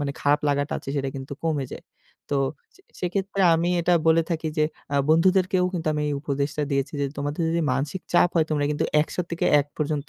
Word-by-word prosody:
মানে 145 -1 -1
খারাপ 145 +1 +3
লাগাটা 145 0 0
আছে, - - -11
সেটা 135 -1 -1
কিন্তু 135 +1 -7
কমে 145 -5 0
যায়। - - -8 0.5
তো 140 - +1 0.4
সে - - -21 0.2
সেক্ষেত্রে 195 +2 -2
আমি 170 +2 +1
এটা 175 +1 +3
বলে 160 +1 +5
থাকি 160 -1 -1
যে 155 - +4 0.3
আ - - 0
বন্ধুদেরকেও 185 +3 +3
কিন্তু 165 -4 -4
আমি 150 0 -1
এই 145 - -1
উপদেশটা 140 +1 -2
দিয়েছি 140 +1 -1
যে, 140 - +1
"তোমাদের 145 +3 -3
যদি 170 +1 +1
মানসিক 150 +7 -2
চাপ 175 - +5
হয়, 160 -2 +4
তোমরা 145 -2 +1
কিন্তু 150 - 0 0.2
১০০ - - -9
থেকে 170 - -2 0.2
১ 140 - -5
পর্যন্ত 150 -2 -2
155 Hz, 210 wpm, -24 LUFS, 145-170 Hz, 0.5 s, বলে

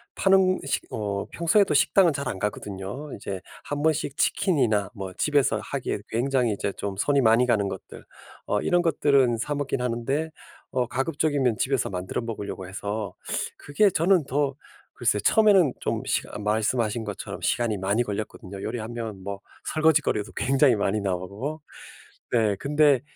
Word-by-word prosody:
파는 190 -1 +4
식 140 - -1
어 100 -2 -2
평소에도 170 +1 +3
식당은 170 +4 +4
잘 140 -1 -3
안 95 - -4
가거든요. 105 +7 -5
이제 100 -2 -6 0.2
한번씩 145 -1 -1
치킨이나 115 - +2
뭐 95 -2 -6
집에서 140 -3 +2
하기에 130 -4 -3
굉장히 125 -1 +1
이제 100 0 -2
좀 100 -1 -4
손이 140 +6 +2
많이 115 +1 +5
가는 105 -5 +2
것들. 95 -1 -9 0.4
어 105 - +1
이런 175 0 +2
것들은 140 -7 +3
사 145 +5 -2
먹긴 140 -3 -2
하는데 125 +6 -1 0.4
어 125 -2 0
가급적이면 135 -3 0
집에서 135 +1 0
만들어 90 +3 -3
먹으려고 105 -5 -5
해서 100 +1 -4 0.4
그게 195 +9 +2
저는 175 -2 +3
더 140 0 0 0.4
글쎄 105 - +1
처음에는 195 - +5
좀 - - -2
식 - - 0
어 - - -4
말씀하신 110 +2 0
것처럼 105 -2 -6
시간이 115 -3 0
많이 100 +5 +1
걸렸거든요. 100 -2 -6
요리하면 115 -4 -5
뭐 100 0 -5 0.3
설거짓거리도 155 -9 +2
굉장히 135 -1 +3
많이 105 0 0
나오고. 100 - -3 0.7
네 110 -4 +3
근데 145 +1 +3
120 Hz, 335 characters per minute, -25 LUFS, 105-145 Hz, 0.7 s, 많이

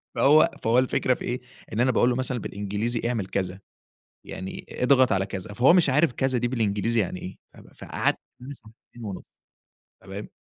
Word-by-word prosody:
فهو 155 +3 +6
فهو 115 +3 +4
الفكرة 130 0 +1
في - - -9
إيه؟ 125 +1 -3 0.3
إن 110 - -2
أنا 130 +1 +4
باقول 120 +1 +3
له 120 - 0
مثلًا 130 -1 -1
بالإنجليزي: 105 +4 -3
"اعمل 110 -6 -2
كذا، 95 -1 -3 0.7
يعني 95 +1 -7
اضغط 130 -2 +3
على 95 0 +1
كذا." 100 +2 -6
فهو 130 +9 +5
مش 175 -5 +4
عارِف 150 0 +3
كذا 130 -1 0
دي 120 +1 0
بالإنجليزي 115 -1 0
يعني 90 -1 -3
إيه. 95 - -8
ف - - -21
ف - - -18
فقعَد - - 0 0.3
معايا 140 +3 -8
ساعتين 115 0 -15
ونُصّ، 100 -3 -9 0.6
تمام؟ - - -8
120 Hz, 185 wpm, -25 LUFS, 100-130 Hz, 0.7 s, فهو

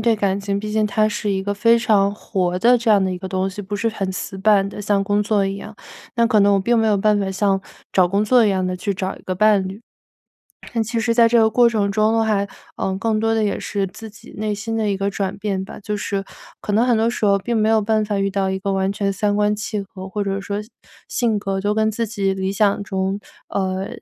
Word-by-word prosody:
对 230 +1 +3
感 200 -2 0
情， 200 0 -2
毕 215 - -5
竟 215 0 +1
它 215 +1 +2
是 210 -1 -2
一 190 -1 -1
个 205 +1 -2
非 230 +3 +4
常 205 -4 +2
活 180 -4 -2
的 240 +6 +5
这 235 -1 0
样 205 -2 +5
的 190 - 0
一 180 - -3
个 190 - -7
东 190 0 -1
西， 205 +2 -7
不 200 +2 -5
是 230 +3 0
很 195 -4 -3
死 190 +1 -5
板 195 0 +3
的， 205 - -7
像 200 -1 +1
工 205 +1 +1
作 205 -2 +1
一 195 0 -3
样， 215 +2 -9 0.4
那 235 - +4
可 215 -2 +3
能 200 0 +5
我 195 - +2
并 235 +4 +2
没 225 - +2
有 210 -2 +3
办 210 +1 +3
法 195 -1 -1
像 195 0 +1 0.3
找 185 -2 +4
工 200 +3 +1
作 240 +2 +4
一 210 - +3
样 185 -1 0
地 185 - -2
去 200 +3 -2
找 190 0 -4
一 - - -15
个 185 - -3
伴 205 -1 +3
侣。 195 +4 -7 0.9
但 225 -1 +1
其 230 +1 -2
实 230 +1 +1
在 230 0 +6
这 235 +1 +4
个 220 - +5
过 240 +2 +5
程 205 -3 0
中 215 +2 +2
呢 - - +3
还 205 -2 +1 0.3
嗯， 190 0 -2
更 220 0 0
多 225 +1 +1
的 220 - +1
也 205 -2 0
是 200 -1 -2
自 220 +3 -10
己 210 - -15
内 210 0 -2
心 225 +2 -4
的 220 -2 0
一 - - +1
个 200 +1 -1
转 195 0 -3
变 195 -2 -2
吧， - - -10
就 210 +1 -3
是， 200 -1 -2 0.4
可 205 - -4
能 235 +3 +3
很 240 -2 +3
多 225 +1 +2
时 230 - -3
候 200 -1 +4
并 230 +4 -2
没 215 0 +2
有 220 -1 +4
办 215 0 +1
法 205 -1 -2
遇 195 0 0
到 195 -1 0
一 190 - -2
个 200 - -2
完 190 0 0
全 200 -1 -1
三 205 +1 0
观 210 0 +1
契 210 0 -3
合， 195 -1 -10
或 205 +2 -3
者 195 0 -2
说 200 +1 -3 0.5
性 230 -4 0
格 195 -1 -2
都 205 +1 0
跟 220 0 +2
自 230 +1 -2
己 200 -3 -1
理 190 0 -2
想 200 0 +2
中 190 0 -2 0.3
呃， 190 0 -2
205 Hz, 290 characters per minute, -20 LUFS, 195-220 Hz, 0.9 s, 在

